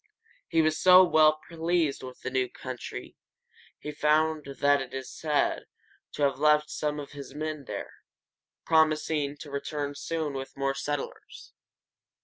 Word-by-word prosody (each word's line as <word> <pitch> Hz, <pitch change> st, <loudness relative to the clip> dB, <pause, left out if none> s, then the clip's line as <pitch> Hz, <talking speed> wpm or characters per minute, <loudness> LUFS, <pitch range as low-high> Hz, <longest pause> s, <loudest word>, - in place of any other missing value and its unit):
He 165 Hz, -2 st, +3 dB
was 155 Hz, 0 st, +1 dB
so 185 Hz, 0 st, +9 dB
well 155 Hz, -3 st, +4 dB
pleased 165 Hz, -3 st, 0 dB
with 130 Hz, -1 st, -10 dB
the 130 Hz, -, -4 dB
new 130 Hz, -1 st, 0 dB
country 130 Hz, -2 st, -7 dB, 0.6 s
he 150 Hz, -, -6 dB
found 155 Hz, +1 st, +2 dB
that 140 Hz, -1 st, +1 dB
he -, -, -4 dB
is 130 Hz, -, -8 dB
said 150 Hz, -2 st, 0 dB, 0.5 s
to 145 Hz, -, -2 dB
have 140 Hz, -1 st, +1 dB
left 150 Hz, 0 st, +3 dB
some 150 Hz, 0 st, -2 dB
of 145 Hz, -, -8 dB
his 140 Hz, -1 st, -10 dB
men 155 Hz, -2 st, -4 dB
there, -, -, -6 dB, 0.7 s
promising 155 Hz, -2 st, +2 dB
to 145 Hz, 0 st, -10 dB
return 145 Hz, 0 st, -3 dB
soon 155 Hz, 0 st, -3 dB
with 135 Hz, 0 st, -7 dB
more 135 Hz, 0 st, 0 dB
settlers. 145 Hz, 0 st, -6 dB
150 Hz, 145 wpm, -28 LUFS, 140-155 Hz, 0.7 s, so